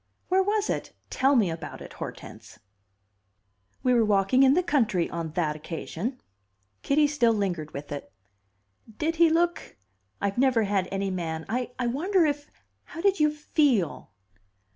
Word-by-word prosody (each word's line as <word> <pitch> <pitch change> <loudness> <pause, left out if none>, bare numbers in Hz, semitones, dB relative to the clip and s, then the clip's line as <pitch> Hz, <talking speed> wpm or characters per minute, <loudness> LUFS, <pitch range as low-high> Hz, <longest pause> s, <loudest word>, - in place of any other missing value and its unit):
"Where 375 +1 +4
was 415 +2 0
it? - - -3 0.2
Tell 275 +2 +3
me 205 -9 +3
about 165 0 -7
it, - - -10
Hortense." - - -9 1.3
"We 255 - +3
were 235 -2 +4
walking 205 +4 +3
in 270 +1 +6
the 365 - +2
country 220 - +1
on 165 -2 -4
that 160 -4 0
occasion." 170 - -5 0.6
Kitty 295 +2 +3
still 285 -6 +2
lingered 180 -7 -2
with 145 0 -8
it. 140 -10 -6 0.9
"Did 325 +2 -1
he 335 0 +6
look 340 - 0 0.4
I've 200 +3 -1
never 255 -4 +3
had 195 -2 0
any 195 0 -1
man 160 -3 -4
I 245 +3 -1
wonder 325 +10 +2
if 290 -1 -2 0.4
how 330 - -8
did 395 0 +2
you 300 0 +4
feel?" 290 - 0
240 Hz, 150 wpm, -26 LUFS, 185-300 Hz, 1.3 s, in